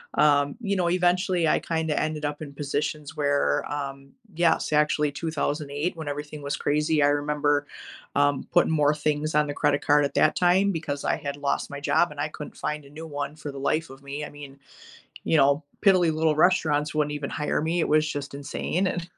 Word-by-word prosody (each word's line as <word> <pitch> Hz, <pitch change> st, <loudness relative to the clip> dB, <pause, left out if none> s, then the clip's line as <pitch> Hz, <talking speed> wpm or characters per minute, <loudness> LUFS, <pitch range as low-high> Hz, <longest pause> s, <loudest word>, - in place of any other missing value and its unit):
um, 145 Hz, -1 st, +3 dB
you 200 Hz, -3 st, -1 dB
know, 180 Hz, -2 st, +1 dB
eventually, 180 Hz, 0 st, +2 dB
I -, -, +3 dB
kinda 160 Hz, -2 st, -1 dB
ended 155 Hz, -1 st, -2 dB
up 145 Hz, +1 st, -4 dB
in 150 Hz, -2 st, -7 dB
positions 145 Hz, +1 st, -3 dB
where, 145 Hz, -1 st, +1 dB
um 140 Hz, -1 st, -5 dB, 0.2 s
yes, 170 Hz, -2 st, +2 dB
actually, 150 Hz, 0 st, +2 dB
2008 150 Hz, +1 st, -2 dB
when 160 Hz, -2 st, -6 dB
everything 150 Hz, +1 st, -6 dB
was 140 Hz, 0 st, -2 dB
crazy, 150 Hz, 0 st, +1 dB
I -, -, +5 dB
remember, 145 Hz, 0 st, +1 dB, 0.5 s
um, 145 Hz, -1 st, +2 dB
putting -, -, +3 dB
more 150 Hz, -1 st, +3 dB
things 150 Hz, 0 st, -1 dB
on 150 Hz, 0 st, +4 dB
the 145 Hz, -, -3 dB
credit 145 Hz, 0 st, +1 dB
card 145 Hz, 0 st, +5 dB
at 140 Hz, -, -5 dB
that -, -, +4 dB
time 185 Hz, +3 st, +3 dB
because 155 Hz, -5 st, -4 dB
I -, -, +2 dB
had 140 Hz, 0 st, -5 dB
lost 140 Hz, -1 st, -1 dB
my 140 Hz, -, -6 dB
job, 150 Hz, +3 st, +2 dB
and 145 Hz, -, -10 dB
I 150 Hz, -, -1 dB
couldn't 150 Hz, -1 st, -9 dB
find 150 Hz, -1 st, -3 dB
a -, -, -14 dB
new 160 Hz, +2 st, -8 dB
one 145 Hz, -1 st, -4 dB
for 155 Hz, -2 st, -7 dB
the 140 Hz, -, -8 dB
life 155 Hz, +4 st, 0 dB
of 135 Hz, 0 st, -13 dB
me. 140 Hz, +2 st, -5 dB
I -, -, -8 dB
mean, 145 Hz, -2 st, -11 dB, 0.7 s
you -, -, +2 dB
know, 140 Hz, +2 st, +4 dB, 0.2 s
piddly 180 Hz, -5 st, +5 dB
little 155 Hz, 0 st, +1 dB
restaurants 155 Hz, -4 st, +2 dB
wouldn't 150 Hz, -1 st, +1 dB
even 145 Hz, -1 st, -4 dB
hire 150 Hz, -1 st, -1 dB
me, 165 Hz, +2 st, 0 dB
it -, -, -1 dB
was 155 Hz, 0 st, +3 dB
just 140 Hz, -1 st, -5 dB
insane, 170 Hz, +6 st, -2 dB
and 175 Hz, -1 st, -3 dB
150 Hz, 205 wpm, -25 LUFS, 145-160 Hz, 0.7 s, I